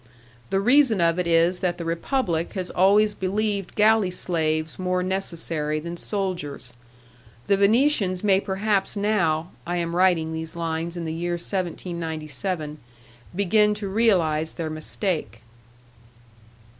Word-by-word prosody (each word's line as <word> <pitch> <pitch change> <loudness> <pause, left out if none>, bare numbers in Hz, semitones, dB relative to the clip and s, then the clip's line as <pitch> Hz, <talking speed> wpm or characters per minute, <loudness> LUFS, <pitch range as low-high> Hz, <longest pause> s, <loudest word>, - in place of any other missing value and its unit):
The 195 - +1
reason 245 0 +4
of 170 +1 +2
it 180 - -1
is 170 +2 +3
that 175 -1 -1
the 170 - -5
Republic 170 - -1
has 185 -2 -3
always 205 +3 +4
believed 200 0 -2
galley 215 -2 +4
slaves 160 -3 -1
more 180 0 0
necessary 165 -5 -2
than 170 +2 -6
soldiers. 175 -10 -3 0.7
The 200 - +3
Venetians 200 -2 +2
may 195 -2 +4
perhaps 195 +1 -1
now 180 -6 0
(I 175 +1 -3
am 170 0 -2
writing 175 -3 +2
these 160 0 -6
lines 165 +1 -3
in 170 - -4
the 160 - -3
year 175 +2 -2
1797) 165 -3 -4 0.6
begin 210 +2 +3
to 205 -1 -4
realize 180 -7 +2
their 160 -2 -4
mistake. 155 - -2
180 Hz, 130 wpm, -24 LUFS, 165-200 Hz, 0.7 s, reason